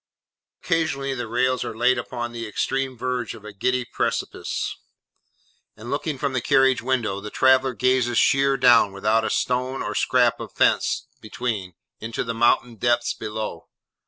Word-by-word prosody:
Occasionally 160 -6 0
the 120 -3 -4
rails 125 +3 +1
are 110 - -6
laid 125 +1 +3
upon 120 0 -5
the 115 -1 -6
extreme 130 +4 -2
verge 125 -2 -3
of 110 -2 -14
a 105 - -9
giddy 125 +5 0
precipice; - - -3 1.0
and 115 +3 -8
looking 145 0 -2
from 140 0 -2
the 130 - 0
carriage 135 +1 +3
window, 115 -6 -1
the 105 - -6
traveller 130 +1 +3
gazes 125 -1 +1
sheer 140 0 +3
down, 120 -5 +5
without 110 +3 +1
a - - -1
stone 125 +1 -1
or - - -3
scrap - - +2
of - - -8
fence - - +2
between, 105 -5 -4 0.2
into 115 +1 -4
the 115 - -3
mountain 120 0 +2
depths 120 +2 +1
below. 110 0 -6
120 Hz, 160 wpm, -23 LUFS, 115-130 Hz, 1.0 s, down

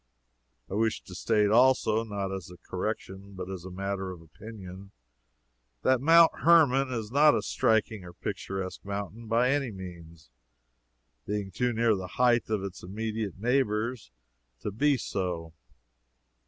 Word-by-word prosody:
I - - -8
wish 110 +2 0
to 95 - -12
state, 105 +1 +2
also, 115 -2 +4
not 100 -3 -4
as 95 -3 -6
a 90 - -12
correction, 95 +4 -5
but 95 0 -6
as 95 -1 -7
matter 95 +1 -4
of 90 -2 -8
opinion, 95 +3 -11 0.9
that 130 -1 +3
Mount 165 +3 +7
Hermon 135 -6 +5
is 115 -3 -4
not 150 +2 +6
a - - -1
striking 110 -2 +1
or 90 - -10
picturesque 95 +1 -5
mountain 100 +3 -5
by 120 +3 +3
any 140 -3 0
means, 85 - -11 1.0
being 105 -1 -3
too 125 +6 0
near 115 -1 +2
the 95 -2 -5
height 120 -2 +3
of 105 -3 -1
its 95 -2 -6
immediate 110 +1 -4
neighbors 115 - 0 0.5
to 105 - -3
be 140 +7 +2
so. 90 -7 -3
105 Hz, 140 wpm, -28 LUFS, 95-120 Hz, 1.0 s, Mount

